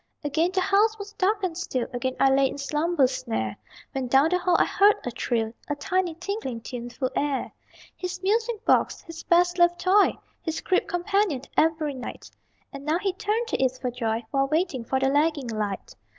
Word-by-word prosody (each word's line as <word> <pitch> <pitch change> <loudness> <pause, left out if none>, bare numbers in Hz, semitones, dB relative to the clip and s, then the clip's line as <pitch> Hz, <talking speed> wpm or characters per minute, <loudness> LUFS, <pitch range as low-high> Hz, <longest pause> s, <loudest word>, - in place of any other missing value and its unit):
Again 315 +4 +1
the 375 0 +1
house 425 +4 +3
was 410 0 -8
dark 400 +2 +1
and 355 -3 -1
still, 260 -8 -2
Again 255 +1 -2
I 270 - +5
lay 270 0 +4
in - - -7
slumber's 295 -1 +1
snare, 110 - -3 0.4
When 265 -2 -3
down 270 +5 +4
the 360 +1 +1
hall 360 -1 +2
I - - +4
heard 410 +1 +4
a 245 - -2
trill, 225 -1 -1 0.2
A 290 - 0
tiny, 355 +3 -1
tinkling, 355 - -4
tuneful 245 +2 -4
air 285 -2 -1 0.4
His 365 0 -5
music 445 +2 0
box! - - +2
His 330 -1 -9
best 355 +1 +3
loved 345 0 +4
toy, 390 +2 +4 0.2
His 320 -1 -3
crib 370 - +1
companion 355 -5 0
every 315 -2 +2
night; 255 -2 -8 0.4
And 275 0 -8
now 310 +3 +1
he 385 +1 -1
turned 430 +5 -1
to - - 0
it 260 -1 +2
for 250 -1 -2
joy 230 -2 -2
While 275 -1 +2
waiting 310 -4 0
for 265 +3 -1
the 270 - +2
lagging 290 -2 +1
light. 210 -3 -3
315 Hz, 195 wpm, -25 LUFS, 260-370 Hz, 0.4 s, I